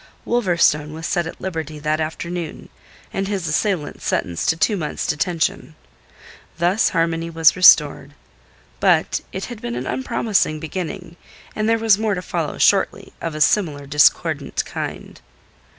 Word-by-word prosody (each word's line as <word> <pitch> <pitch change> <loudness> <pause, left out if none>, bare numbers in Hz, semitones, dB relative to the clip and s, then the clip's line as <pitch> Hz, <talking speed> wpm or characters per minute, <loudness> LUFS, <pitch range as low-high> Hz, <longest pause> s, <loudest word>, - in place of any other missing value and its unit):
Wolverstone 170 -9 +2
was 160 +1 -7
set 175 -1 0
at - - -9
liberty 160 -4 -5
that 155 +1 -1
afternoon, 170 +1 -5 0.4
and 195 0 -2
his 195 -4 -2
assailant 160 -1 -1
sentenced 85 -2 -1
to 160 - +2
two 165 +7 +2
months' 155 -6 -3
detention. 160 0 -1 0.8
Thus 175 +6 +2
harmony 165 0 -1
was 165 -2 +4
restored. 150 -5 +5 0.6
But - - +2
it 190 - -4
had 240 -4 -9
been 120 0 -4
an 125 +1 -4
unpromising 215 - 0
beginning, 175 +2 -6 0.4
and 215 +1 0
there 225 - +3
was 220 -3 +3
more 215 -2 0
to 180 - -5
follow - - -3
shortly - - +2
of 165 -2 -4
a 155 - -5
similar 150 -5 +2
discordant 145 +1 +2
kind. - - -7
165 Hz, 145 wpm, -21 LUFS, 155-195 Hz, 0.8 s, restored